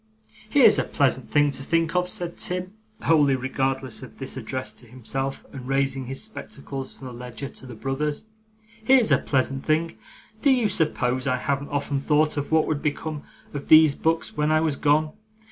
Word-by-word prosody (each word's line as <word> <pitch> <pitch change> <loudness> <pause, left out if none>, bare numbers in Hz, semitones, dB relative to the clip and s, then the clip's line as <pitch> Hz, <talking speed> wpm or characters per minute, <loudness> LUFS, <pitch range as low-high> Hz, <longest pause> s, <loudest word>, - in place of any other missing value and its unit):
'Here's - - +6
a - - +2
pleasant - - 0
thing 145 -1 +3
to 135 - -5
think 165 +4 0
of!' 180 0 +1
said 175 -1 -3
Tim, 180 +1 -3 0.3
wholly 145 -4 +4
regardless 130 -1 -2
of - - -11
this - - -5
address 130 0 -4
to 120 - -15
himself, 130 +3 -4
and 130 -2 -8
raising 135 -1 0
his 135 +1 -3
spectacles 140 -10 -7
from 135 - -12
the 125 - -7
ledger 125 +3 -7
to 130 - -10
the 120 - -9
brothers. 145 - -2 0.6
'Here's 255 -1 +5
a - - +5
pleasant 135 0 -1
thing. 160 +2 0 0.4
Do 285 - +4
you 245 -5 +3
suppose 130 -6 +1
I 130 -1 +2
haven't 140 +2 -2
often 145 -1 -1
thought 150 +2 +2
of 145 0 -3
what 160 -1 +4
would 150 -2 -2
become 150 0 -3 0.3
of 145 -1 -6
these 155 -2 +8
books 160 +3 -1
when 150 +1 +1
I 155 - +4
was 155 -2 +1
gone? 150 +2 +2
145 Hz, 185 wpm, -24 LUFS, 135-160 Hz, 0.6 s, these